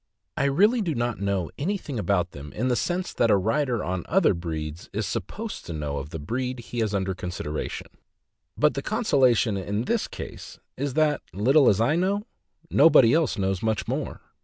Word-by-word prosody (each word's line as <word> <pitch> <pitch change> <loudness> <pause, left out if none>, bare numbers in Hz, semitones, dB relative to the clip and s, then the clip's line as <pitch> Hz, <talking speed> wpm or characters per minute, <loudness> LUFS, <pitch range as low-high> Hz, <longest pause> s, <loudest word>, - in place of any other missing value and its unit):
I - - +1
really 205 - +4
do 170 -6 -1
not 120 -1 -1
know 100 -3 -1
anything 155 - -2
about 95 -4 0
them 70 0 -9
in 125 +4 -1
the 125 - +2
sense 180 +7 -2
that 115 - +2
a 100 - +5
writer 120 +4 0
on 90 0 -2
other 180 - +4
breeds 80 -2 -5
is 105 +1 -2
supposed 115 - -5
to 85 - -5
know 75 -2 -3
of 70 +1 -7
the 80 - -6
breed 125 - -3
he 120 0 -6
has 110 -2 0
under 95 -1 0
consideration; 90 -4 -5 0.7
but - - +3
the - - -3
consolation 120 -6 +2
in 100 +3 -2
this - - 0
case - - -9 0.2
is 140 -1 -3
that, 155 -2 +2
little 130 +8 +5
as 100 - +2
I 120 +7 +3
know, 195 +3 +1 0.5
nobody 140 -6 +6
else 155 -6 +2
knows 95 -2 -1
much 110 -1 -1
more. - - -3
115 Hz, 185 wpm, -25 LUFS, 95-140 Hz, 0.7 s, nobody